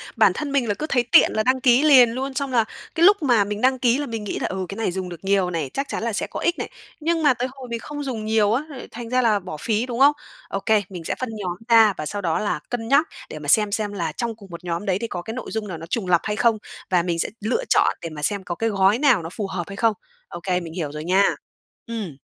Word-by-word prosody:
Bản - - +5
thân 300 -2 -4
mình 270 -4 +1
là 205 - +1
cứ 300 - -4
thấy 245 -3 +2
tiện - - +7
là 215 - +1
đăng 255 +2 +2
ký 250 +1 +5
liền 265 -6 +7
luôn, 265 +3 -4
xong 275 0 -2
là 235 -3 +3 0.3
cái 335 0 +4
lúc 405 0 +6
mà 240 -7 +4
mình 205 +1 -4
đăng 260 0 +3
ký 245 0 +3
là 290 - -2
mình 225 -4 -5
nghĩ 205 - -4
là - - -1
"Ừ, 190 0 -3
cái 195 - -6
này 225 -4 -1
dùng 185 0 -4
được 175 0 -10
nhiều 195 -2 +2
này, 165 -6 -3
chắc 275 0 -2
chắn - - -4
là 230 -1 -1
sẽ - - -2
có - - -6
ích 345 - 0
này", - - -4 0.3
nhưng 330 +1 0
mà 290 -3 +5
tới 245 +1 -2
hồi 265 -1 -10
mình 235 0 -3
không 290 +4 -6
dùng 240 -6 -4
nhiều 215 -1 +2
á, 260 +5 0
lại 275 -4 -9
thành 235 0 -7
ra 255 +1 +2
là 220 -4 +3
bỏ 180 -5 -7
phí, 220 +7 0
đúng 245 -1 -5
không? 280 +2 +7 0.4
Ô 195 - -2
kê, 215 +1 +2
mình 180 -4 -8
sẽ - - -2
phân 255 - -3
nhóm 180 -4 -4
ra 225 -3 +6
và 155 - -4
sau 205 +6 -4
đó 165 -4 0
là 205 -7 -1
cân 225 -2 -3
nhắc 285 +5 +4 0.2
để 155 - -7
mà 150 - -8
xem 210 +7 +4
xem 205 -1 -2
là 170 -5 -2
trong 235 +6 -3
cùng 200 -3 -15
1 170 - -9
nhóm 170 +2 -3
đấy 190 -3 +1
thì 230 - -3
có 175 - -5
cái 220 - -6
nội 250 -1 -6
dung 220 -1 -3
nào 180 -4 -5
nó 160 - -8
trùng 205 -1 -2
lặp 175 -2 +3
hay 210 - -2
không 230 0 +3 0.3
và 180 -2 +3
mình 170 -1 -2
sẽ - - 0
lựa 235 - 0
chọn - - +3
để 165 - -5
mà 155 -2 -8
xem 200 +5 0
có 175 -1 -4
cái 225 +5 0
gói 200 +2 +3
nào 265 - +4
nó 165 - -5
phù 200 +3 -4
hợp 185 -2 -3
hay 195 - -7
không. 225 +2 +2 0.3
Ô 175 - -8
kê, 180 -1 0
mình 165 -2 -8
hiểu 160 -5 -3
rồi 150 +1 -6
nha. 185 +4 +3 0.6
Ừm. 215 -10 -5
215 Hz, 305 wpm, -23 LUFS, 185-250 Hz, 0.6 s, tiện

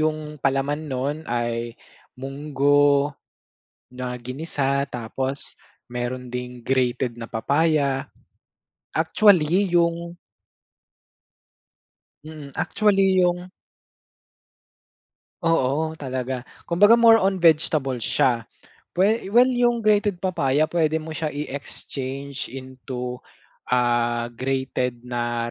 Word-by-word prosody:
'yung 155 -1 -2
palaman 135 +2 0
nun 135 +3 -2
ay 120 0 -2 0.4
munggo 145 +1 +2 0.8
na 125 0 -5
ginisa 140 +1 -1
tapos 130 +2 -4 0.3
meron 125 +1 -4
ding 125 0 -6
grated 125 -2 0
na 115 - -6
papaya. 140 +3 +1 0.8
Actually 180 +1 +3
'yung 170 0 0 2.1
Mm, 150 -3 -10
actually 195 -3 +3
yung 180 +1 0 1.9
Oo 160 0 +1
talaga, 130 -2 -4 0.2
kumbaga 205 +6 +6
more 230 -1 +7
on 190 -2 0
vegetables 150 -6 +2
siya. 120 -3 +1 0.5
We 200 +4 +2
well 250 +2 +7
'yung 240 -2 +2
grated 205 -3 +2
papaya 155 -5 +1
puwede 160 -2 +1
mo 160 - -8
siya 155 0 -3
i-exchange 140 -1 -5
into, 130 -1 -6 0.5
ah, 120 -1 +1
grated 125 -1 -2
na 120 -1 -2
140 Hz, 90 wpm, -23 LUFS, 125-165 Hz, 2.1 s, more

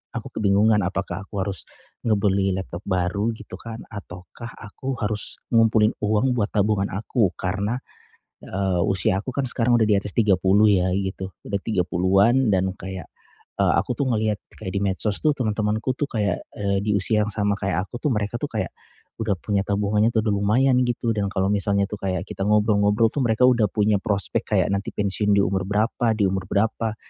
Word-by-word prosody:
aku - - -5
kebingungan 105 +1 +4
apakah 100 0 -4
aku 100 -2 -3
harus 95 -6 -4 0.4
ngebeli 100 -3 +2
laptop 95 -2 -5
baru 100 +4 0
gitu - - -10
kan, 115 -1 -8
ataukah 100 +3 -9
aku 130 +5 -5
harus 105 0 -2 0.2
ngumpulin 110 -2 +4
uang 110 +4 +1
buat 105 - +1
tabungan 100 -1 +2
aku. 105 0 -1
Karena, 100 +5 -2 0.7
eee, 95 -2 -1
usia 95 0 +2
aku 130 +4 -7
kan 140 - 0
sekarang 120 -1 +2
udah 115 - +3
di 105 -2 +3
atas 100 0 -6
30 105 0 +4
ya 90 - +1
gitu, 95 -1 -3 0.2
udah 100 -1 -2
30-an 95 +5 +2
dan 95 -2 +1
kayak, 95 -4 -7 0.5
eee, - - +4
aku - - 0
tuh 140 - 0
ngelihat 110 -2 0 0.2
kayak 95 -4 -5
di 100 - 0
medsos 100 +1 0
tuh 155 - +4
temen-temanku 110 +1 -1
tuh 140 +2 -2
kayak, 105 -5 -1 0.2
eee, 100 -1 0
di 105 - -1
usia 105 +2 +2
yang - - -4
sama 105 -1 +1
kayak 95 -1 -1
aku 120 - -8
tuh 150 - +1
mereka 105 -2 -2
tuh - - -3
kayak - - -3 0.5
udah 105 -2 +1
punya 100 +1 0
tabungannya 105 +2 +2
tuh 110 -1 +2
udah 105 - +2
lumayan 125 +6 +3
gitu. 120 -2 -1
Dan 100 -2 -1
kalau 95 -1 0
misalnya 100 0 +1
tuh 105 - -6
kayak 90 -1 -2
kita - - -6
ngobrol-ngobrol 105 +1 +3
tuh 145 - -1
mereka 115 +2 +3
udah 120 -4 +4
punya 105 -1 +2
prospek 100 -3 -1
kayak - - +2
nanti 100 +1 -3
pensiun 105 0 +1
di - - +5
umur 95 +1 0
berapa 110 +3 +1
di 100 - +3
umur 95 0 -2
berapa. 110 +1 0
105 Hz, 185 wpm, -23 LUFS, 95-110 Hz, 0.7 s, di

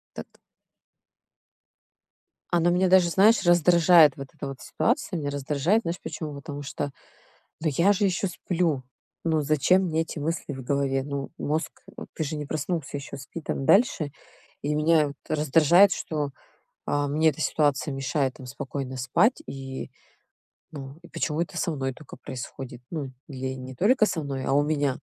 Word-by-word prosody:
Так. - - -7 2.2
Она 175 0 +3
меня 185 +1 +3
даже, 185 -2 +5
знаешь, 200 +5 +5
раздражает 175 -2 +6
вот 135 - -7
эта 140 -3 -6
вот 135 -1 -7
ситуация. 165 +3 -1
Меня 145 -2 -2
раздражает, 145 +8 +1
знаешь 170 +2 -3
почему? 155 -7 -5
Потому 145 0 -7
что, 140 0 -4 0.7
ну, 160 - +1
я 170 +8 +4
же 205 - -1
ещё 190 +1 0
сплю. 170 -5 -1 0.4
Ну, 160 -2 +1
зачем 155 +6 +3
мне 160 -2 0
эти 160 - -5
мысли 155 -1 -3
в 135 - -7
голове? 135 0 0
Ну, 140 -1 -5
мозг, 155 +3 -1 0.3
э, - - -6
ты 160 - -2
же 155 +1 -3
не 150 -1 -4
проснулся 155 -1 -3
ещё, 140 0 -8
спи 140 +5 -8
там 135 - -3
дальше. 185 - +3 0.5
И 150 +1 -1
меня 155 0 +4
вот 140 - -8
раздражает, 160 +6 +5
что, 150 -3 -3 0.5
а, 145 0 0
мне 155 +3 +3
эта 155 +1 -5
ситуация 145 -2 +1
мешает 135 0 -1
там 130 - -11
спокойно 130 0 -5
спать. 175 - +2
И, 135 -1 -6 0.8
ну, 140 -2 -8
и - - -12
почему 155 -1 -2
это 175 - -4
со 170 - 0
мной 135 -3 -2
тока 150 +2 -13
происходит? 125 0 -8
Ну, 145 -6 -4 0.2
или 130 -2 -4
не 130 0 -8
только 215 - +4
со 165 - -2
мной, 135 -2 -4
а - - +1
у 145 +1 +4
меня. 145 -3 0
150 Hz, 165 wpm, -26 LUFS, 135-170 Hz, 2.2 s, раздражает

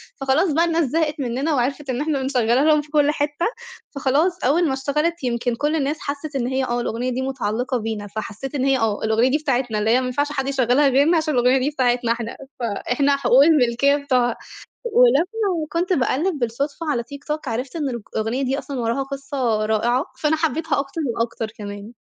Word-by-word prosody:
فخلاص 290 +6 +1
بقى 335 +3 +3
الناس 330 -1 +1
زهقت 305 +2 -1
منّنا 270 +4 -1
وعرفت 275 +2 -1
إن 255 +2 -1
إحنا 300 -3 -1
بنشغّلها 250 -1 +2
لهم 305 -1 +4
في 295 - -16
كل 295 -1 +3
حتّة، 295 +2 -1 0.5
فخلاص 295 +7 +1
أول 320 +7 +3
ما 270 - 0
اشتغلت 300 +5 -1
يمكن 240 -1 -1
كل 295 +5 0
الناس 295 0 -1
حسِّت 285 +1 -5
إن 245 -3 0
هي 265 +1 0
آه 240 -1 -1
الأغنية 240 +2 -2
دي 255 +1 -2
مُتعلِّقة 250 -1 -2
بينا، 220 -2 -4
فحسّيت 220 +6 -6
إن 265 -1 0
هي 270 -1 +3
آه. 220 -3 -1
الأغنية 220 +3 +3
دي 290 - +2
بتاعتنا، 250 -7 -1
اللي 215 +1 0
هي 245 +3 +4
ما 255 - -3
ينفعش 285 +4 -1
حد 270 -2 -2
يشغّلها 275 +1 +3
غيرنا 285 +6 +4
عشان 315 -2 0
الأغنية 250 +1 +4
دي 265 - 0
بتاعتنا 245 -4 +1
إحنا، 230 0 -3 0.2
فإحنا 245 +5 0
حقوق 270 0 +5
الملكية 280 -3 +4
بتوعها. 255 -4 +1 0.6
ولمّا 390 - +2
كنت 355 +2 0
باقلِّب 295 +3 0
بالصُدفة 280 +7 -2
على 235 -4 -1
تيك 280 +3 -11
توك، 300 -1 -4
عرفت 250 +4 -3
إن 295 -4 -1
الأغنية 235 +2 -3
دي 265 +1 0
أصلًا 275 -3 -6
وراها 235 +3 0
قصة 270 -5 -2
رائعة، 240 - +1 0.2
فأنا 310 +1 +2
حبّيتها 320 -1 0
أكتر 280 +4 -4
وأكتر 230 -1 -2
كمان. 205 +2 -8
270 Hz, 195 wpm, -22 LUFS, 240-300 Hz, 0.6 s, حقوق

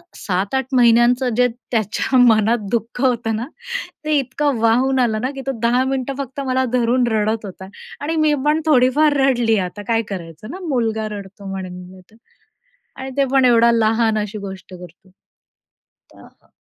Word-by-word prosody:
7-8 200 +8 -2
महिन्यांचं 240 +1 +4
जे 250 - +4 0.2
त्याच्या 225 +4 0
मनात 230 -1 +4
दुःख 235 +2 -2
होतं 235 -4 +1
ना 230 +4 -4 0.6
ते 310 - -1
इतकं 275 +1 -1
वाहून 255 +4 +2
आलं 220 -3 +1
ना, 260 +2 -2
की 270 - -6
तो 270 - +1
10 245 +2 +3
मिनिटं 270 0 -2
फक्त 275 0 -5
मला 260 0 +1
धरून 245 0 +2
रडत 215 0 0
होता 190 0 -9 0.3
आणि 320 +3 -2
मी 310 -1 +3
पण 305 +2 +2
थोडीफार 290 +2 +4
रडली 245 -5 +2
आता 205 +3 -10
काय 230 -1 +2
करायचं 180 - -8
ना, 370 - -7
मुलगा 225 -5 -1
रडतो 200 0 -11
म्हणून 180 -1 -7
होतं. 190 +4 -18 0.8
आणि 265 0 -7
ते 275 - +3
पण 265 -1 +4
एवढा 235 -1 +5
लहान 225 -1 +2
अशी 210 0 -4
गोष्ट 190 -1 -10
करतो. 180 +1 -15 1.1
आह - - -21
235 Hz, 160 wpm, -19 LUFS, 215-260 Hz, 1.1 s, एवढा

